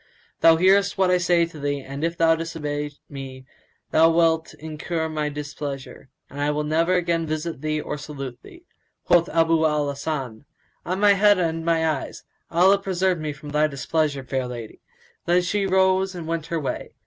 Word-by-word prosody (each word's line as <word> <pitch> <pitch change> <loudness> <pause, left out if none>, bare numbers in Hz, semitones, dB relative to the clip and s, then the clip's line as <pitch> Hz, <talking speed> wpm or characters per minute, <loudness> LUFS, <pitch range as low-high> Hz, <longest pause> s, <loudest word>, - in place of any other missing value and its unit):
Thou 165 0 +7
hearest 195 +4 +3
what 190 -1 +3
I 180 - +3
say 175 -1 +3
to 165 -2 -11
thee 145 0 -1
and, 140 +2 -7
if 170 +1 -1
thou 165 0 +4
disobey 150 -3 -4 0.2
me, 135 -2 -9 0.5
thou 160 +1 +5
wilt 165 -1 +2
incur 160 +1 -4
my 155 -1 -2
displeasure 140 -2 -7 0.2
and 145 - -7
I 145 - +1
will 150 0 -1
never 165 +4 +1
again 170 -2 0
visit 155 -1 -4
thee 155 0 -1
or 150 - -5
salute 140 -4 -7
thee." 345 0 -15 0.4
Quoth 175 0 +4
Abu 165 0 +2
al 150 -2 +1
Hasan, 140 -4 -4 0.4
"On 185 +2 -1
my 205 0 +6
head 205 0 +5
and 165 -2 -1
my 165 -1 +2
eyes: 155 -4 -3 0.3
Allah 185 +4 +4
preserve 190 -2 0
me 155 -1 -3
from 145 +1 -10
thy 150 +1 +2
displeasure, 145 0 -1
fair 130 -1 -2
lady!" 120 -3 -8 0.5
Then 175 +1 +3
she 195 +2 0
rose 190 0 +2
and 170 -2 -6
went 165 -1 -3
her 170 -1 -2
way. 140 - -4
160 Hz, 185 wpm, -23 LUFS, 145-175 Hz, 0.5 s, Thou